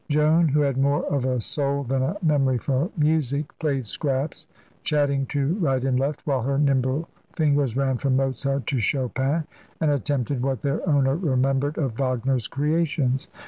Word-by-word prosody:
Joan, 155 Hz, +3 st, +4 dB
who 150 Hz, +1 st, +2 dB
had 140 Hz, -3 st, +1 dB
more 140 Hz, +1 st, +2 dB
of 135 Hz, -3 st, 0 dB
a 130 Hz, -1 st, 0 dB
soul 140 Hz, +4 st, +1 dB
than 135 Hz, +1 st, -1 dB
a 135 Hz, +10 st, -1 dB
memory 140 Hz, -5 st, +2 dB
for 135 Hz, -, -1 dB
music, 150 Hz, -2 st, 0 dB
played 140 Hz, -6 st, -1 dB
scraps, 140 Hz, +6 st, -2 dB, 0.3 s
chatting 140 Hz, -3 st, +1 dB
to 140 Hz, +2 st, 0 dB
right 135 Hz, -7 st, +1 dB
and 130 Hz, -1 st, +1 dB
left 140 Hz, +2 st, -2 dB
while 135 Hz, -3 st, 0 dB
her 135 Hz, +3 st, -1 dB
nimble 140 Hz, +2 st, +1 dB, 0.3 s
fingers 145 Hz, -6 st, +1 dB
ran 135 Hz, -2 st, +1 dB
from 135 Hz, 0 st, 0 dB
Mozart 135 Hz, +1 st, -1 dB
to 135 Hz, -, -1 dB
Chopin 135 Hz, +5 st, 0 dB, 0.4 s
and 155 Hz, -2 st, +2 dB
attempted 140 Hz, -1 st, -1 dB
what 135 Hz, 0 st, -1 dB
their 140 Hz, +1 st, -1 dB
owner 135 Hz, -2 st, +3 dB
remembered 135 Hz, -2 st, 0 dB
of 135 Hz, -7 st, -2 dB
Wagner's 130 Hz, -2 st, 0 dB
creations. 145 Hz, -3 st, 0 dB
140 Hz, 165 wpm, -24 LUFS, 130-150 Hz, 0.4 s, Joan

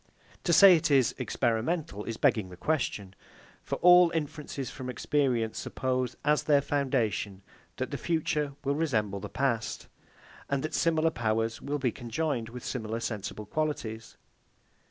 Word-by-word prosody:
To 175 Hz, -, +2 dB
say 190 Hz, +2 st, +9 dB
it 165 Hz, 0 st, 0 dB
is 135 Hz, -5 st, +4 dB
experimental, 120 Hz, -, -1 dB
is 115 Hz, -1 st, -4 dB
begging 105 Hz, -5 st, +2 dB
the 90 Hz, -, -11 dB
question. 105 Hz, -, -2 dB, 0.5 s
For -, -, -3 dB
all 180 Hz, 0 st, +8 dB
inferences 150 Hz, -4 st, -4 dB
from 130 Hz, -3 st, -7 dB
experience 125 Hz, -4 st, 0 dB
suppose, 130 Hz, -1 st, -2 dB
as 150 Hz, 0 st, +3 dB
their 145 Hz, -2 st, +4 dB
foundation, 120 Hz, -9 st, -1 dB, 0.3 s
that -, -, -3 dB
the -, -, -4 dB
future 155 Hz, -3 st, -1 dB
will 140 Hz, 0 st, +1 dB
resemble 110 Hz, -10 st, 0 dB
the -, -, -7 dB
past, 120 Hz, -5 st, -2 dB, 0.6 s
and 140 Hz, -1 st, 0 dB
that 155 Hz, -, -4 dB
similar 165 Hz, -1 st, +2 dB
powers 115 Hz, -2 st, -1 dB
will 145 Hz, +1 st, -2 dB
be 130 Hz, -4 st, 0 dB
conjoined 120 Hz, 0 st, -3 dB
with 125 Hz, +1 st, -9 dB
similar 115 Hz, -2 st, -3 dB
sensible 110 Hz, -2 st, -5 dB
qualities. 115 Hz, -4 st, -3 dB
130 Hz, 145 wpm, -29 LUFS, 115-150 Hz, 0.6 s, say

